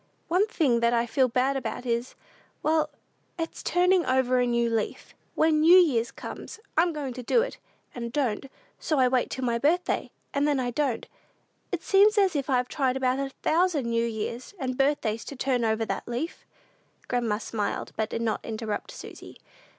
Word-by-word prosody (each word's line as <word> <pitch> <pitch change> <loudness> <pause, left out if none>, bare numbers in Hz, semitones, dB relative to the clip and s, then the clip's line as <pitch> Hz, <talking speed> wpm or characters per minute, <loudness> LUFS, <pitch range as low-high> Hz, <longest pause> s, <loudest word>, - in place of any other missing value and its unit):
One 370 +5 +3
thing 280 - +2
that 235 0 +2
I 235 0 +2
feel 255 +2 +2
bad 255 +3 +1
about 265 -1 -4
is 235 +1 -2 0.5
well, 310 -1 +2 0.5
it's 330 -1 -4
turning 360 0 +3
over 255 -2 +2
a 245 - +2
new 235 0 +2
leaf. 225 -2 -3 0.2
When 315 -1 +3
New 340 +4 +8
Year's 260 -11 +4
comes, - - -8 0.2
I'm 340 +2 +4
going 290 -5 -4
to 250 - -6
do 460 - +3
it, - - -6 0.3
and 235 -1 -5
don't; 260 -3 -1 0.3
so 310 - 0
I 260 -1 +5
wait 250 -1 +1
till 260 - -3
my 235 -1 0
birthday, 340 +7 +1 0.2
and 285 +1 +2
then 290 -2 +2
I 245 -1 -1
don't. 265 -2 -1 0.6
It 355 -3 -3
seems 415 +2 +5
as 385 -4 +3
if 280 -1 -1
I'd 250 -2 +2
tried 265 -2 0
about 260 0 +1
a 275 0 -2
thousand 330 -5 +2
New 230 0 +1
Years 230 - -5
and 255 -5 -3
birthdays 250 -5 +1
to 280 - -7
turn 255 -2 0
over 220 0 +1
that - - -4
leaf." 245 +8 -4 0.6
Grandma 235 -4 0
smiled, 210 -1 -3
but 220 0 -1
did 230 - -3
not 220 -2 -1
interrupt 220 -1 -4
Susy. - - -10
260 Hz, 185 wpm, -27 LUFS, 235-310 Hz, 0.6 s, New